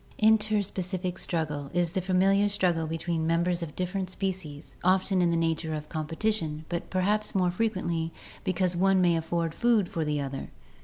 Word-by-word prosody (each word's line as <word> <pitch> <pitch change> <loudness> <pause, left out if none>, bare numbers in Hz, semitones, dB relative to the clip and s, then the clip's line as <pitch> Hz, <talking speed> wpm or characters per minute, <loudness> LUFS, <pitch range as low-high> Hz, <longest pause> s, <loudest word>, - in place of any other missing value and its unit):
Interspecific 200 -4 +1
struggle 150 -4 -2
is 175 -2 +2
the 190 +1 -1
familiar 195 +2 +3
struggle 175 -5 +1
between 165 0 -2
members 170 +1 +1
of 155 -3 -6
different 185 +1 -2
species, 185 -6 -4
often 185 +1 +3
in 175 - +3
the 170 - +1
nature 160 -1 0
of 150 0 -6
competition, 160 0 -2
but 170 -1 -3
perhaps 205 +3 +1
more 180 -2 +3
frequently 175 -5 -1 0.3
because 185 0 +1
the 175 - -3
one 195 0 +4
may 175 -2 +4
afford 165 0 -1
food 230 -4 +3
for 165 - -2
the 150 -1 -1
other. 135 -1 -4
175 Hz, 165 wpm, -28 LUFS, 165-190 Hz, 0.3 s, one